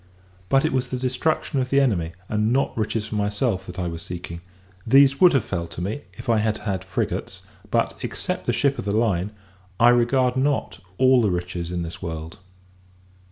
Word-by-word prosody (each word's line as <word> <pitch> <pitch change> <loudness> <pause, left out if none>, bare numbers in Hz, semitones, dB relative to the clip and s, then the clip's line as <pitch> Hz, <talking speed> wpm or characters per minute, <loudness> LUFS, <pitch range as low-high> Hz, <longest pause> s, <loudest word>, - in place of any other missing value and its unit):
But 135 +2 +4
it - - 0
was 130 -1 0
the 125 - -2
destruction 140 +4 0
of 130 0 -1
the 140 - +4
enemy, 90 -12 +1
and 105 +1 0
not 135 +2 +1
riches 110 0 -1
for - - -8
myself, 105 -1 -1
that 90 - -8
I 90 - -2
was 85 -1 -5
seeking: 85 -1 -7 0.4
these 135 +3 +5
would 180 -2 +7
have 135 -6 +3
fell 85 -3 -3
to 80 - -9
me, 100 +10 -3
if - - -11
I 115 -2 +3
had 110 0 0
had 95 -5 -3
frigates; - - -3 0.3
but, - - +1
except - - -4
the - - +3
ship 140 -1 +1
of - - -4
the 100 - -1
line, 105 -4 +1 0.5
I 120 - +7
regard 125 +1 +3
not 140 +2 0 0.2
all 130 -1 +5
the 105 - +2
riches 90 -1 -3
in 90 -1 -2
this 85 0 -7
world. 80 0 -6
110 Hz, 200 wpm, -23 LUFS, 90-130 Hz, 0.5 s, would